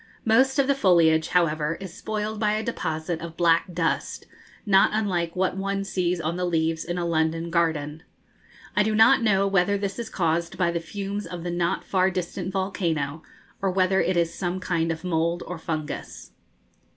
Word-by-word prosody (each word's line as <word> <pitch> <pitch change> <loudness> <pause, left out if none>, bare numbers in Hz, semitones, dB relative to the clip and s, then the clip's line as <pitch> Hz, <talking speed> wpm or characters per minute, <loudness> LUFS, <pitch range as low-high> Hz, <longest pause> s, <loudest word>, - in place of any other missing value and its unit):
Most 265 +5 +4
of 275 - +4
the 280 - +3
foliage, 165 -9 +4
however, 165 -3 +1
is 190 -3 -8
spoiled 215 +1 -4
by 210 -1 +2
a 215 +1 -1
deposit 160 -7 -3
of 165 -1 -8
black 170 +1 +3
dust, 165 -5 -2 0.4
not 195 -2 +5
unlike 180 -6 -1
what 185 0 0
one 195 0 -2
sees 180 -2 -1
on 165 +2 -2
the 180 - -2
leaves 165 -2 0
in 175 +1 -4
a 175 - -1
London 165 0 0
garden. 160 -3 0 0.7
I - - +4
do 215 +1 +1
not 225 +3 +6
know 200 -3 +3
whether 195 0 +2
this 200 +2 -4
is 235 - -4
caused 170 -1 -1
by 175 -2 +2
the 170 - -1
fumes 200 +4 -5
of 175 -1 -7
the 175 - -3
not 175 0 -1
far 185 -1 +2
distant 180 0 -4
volcano, 165 -6 -2 0.4
or 195 - +1
whether 185 +1 +2
it 185 -1 0
is 170 -1 +1
some 180 0 -3
kind 165 -3 0
of 160 0 -5
mould 170 0 0
or 175 -1 -6
fungus. 155 -2 -5
175 Hz, 185 wpm, -25 LUFS, 165-195 Hz, 0.7 s, not